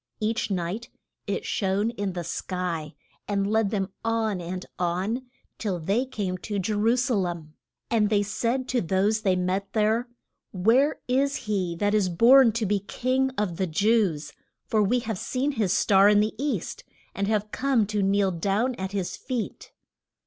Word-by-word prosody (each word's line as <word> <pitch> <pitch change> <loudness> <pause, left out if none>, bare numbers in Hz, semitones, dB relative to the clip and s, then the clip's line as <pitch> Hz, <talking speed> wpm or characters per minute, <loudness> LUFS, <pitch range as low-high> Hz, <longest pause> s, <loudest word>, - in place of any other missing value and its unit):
Each 220 +1 -1
night 190 +4 -3 0.4
it - - -2
shone 200 +1 0
in 205 -5 -3
the 175 -1 -4
sky, 170 -4 -4 0.3
and 200 -1 0
led 215 0 +2
them 195 -2 -1
on 225 -4 0
and 180 +2 -5
on 190 +9 -1 0.3
till 200 -5 -1
they 200 +10 0
came 190 -7 -3
to 205 +4 -4
Je 200 +3 -1
ru 225 +4 +2
sa 250 +1 +1
lem. 175 -6 -2 0.4
And 215 -3 +3
they 205 -1 +2
said 235 +5 -1
to 250 -2 +1
those 195 +5 +1
they 190 -4 +2
met 185 +2 -2
there, 220 +3 +2 0.4
Where 230 +10 +3
is 275 +3 +1
he 190 -5 -1
that 205 +4 0
is 205 -3 +2
born 235 +7 +6
to 225 0 -1
be 205 0 +1
King 255 +6 0
of 185 -5 -1
the 190 - 0
Jews? 175 -5 +1 0.3
for 220 - +1
we 240 +5 +2
have 220 -4 -4
seen 265 +3 -1
his 215 -9 0
star 200 0 +5
in 210 0 +5
the 215 +1 +1
east, 250 - -3 0.3
and 200 +1 -2
have 215 0 0
come 260 -5 +2
to 210 0 -1
kneel 195 0 +2
down 200 +9 0
at 190 +1 -4
his 190 -3 -2
feet. 250 -5 -5
205 Hz, 175 wpm, -26 LUFS, 185-230 Hz, 0.4 s, born